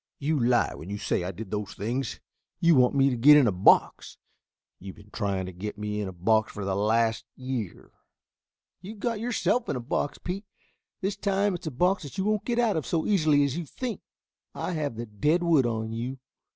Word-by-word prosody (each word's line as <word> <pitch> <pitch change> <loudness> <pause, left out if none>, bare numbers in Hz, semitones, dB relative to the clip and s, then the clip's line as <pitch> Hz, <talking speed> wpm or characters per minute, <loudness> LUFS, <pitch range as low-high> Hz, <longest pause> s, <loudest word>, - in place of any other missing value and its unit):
"You 150 +1 0
lie 120 0 +2
when 85 - -9
you 100 - -3
say 95 - -1
I 90 - -3
did 100 +1 -9
those 105 -2 -4
things. 120 +6 -3 0.4
You 170 0 +5
want 130 0 +4
to 135 -2 +4
get 140 +6 +8
me - - +8
in - - +3
a 110 - +3
box. 90 +1 +3 0.6
You've 95 0 -9
been 105 0 -17
trying 100 -4 -2
to 95 - -6
get 100 +4 -6
me 105 0 -3
in 100 - -3
a - - -5
box 110 +5 +1
for 100 -2 -6
the 95 - -1
last 110 +2 +1
year." 130 -8 -5 0.9
"You 195 +4 -8
have 215 - -15
got 230 0 -1
yourself 240 +1 0
in - - 0
a - - -2
box, 125 +4 -2
Pete. 195 +3 -5 0.6
This 195 +1 -1
time 200 0 +1
it's 175 -2 -6
a - - -2
box 180 +9 +1
that 145 +4 -9
you 190 - -1
won't 215 -1 0
get 240 -1 -1
out 230 -6 +2
of 155 - -3
so 165 -2 0
easily 155 -8 +3
as 140 -1 -1
you 175 - -3
think. 235 - -5 0.5
I - - -3
have 150 -7 -2
the 120 +1 -5
dead 150 - +1
wood 160 -7 +4
on 110 -1 -3
you." 125 +4 -4
130 Hz, 220 wpm, -27 LUFS, 105-175 Hz, 0.9 s, get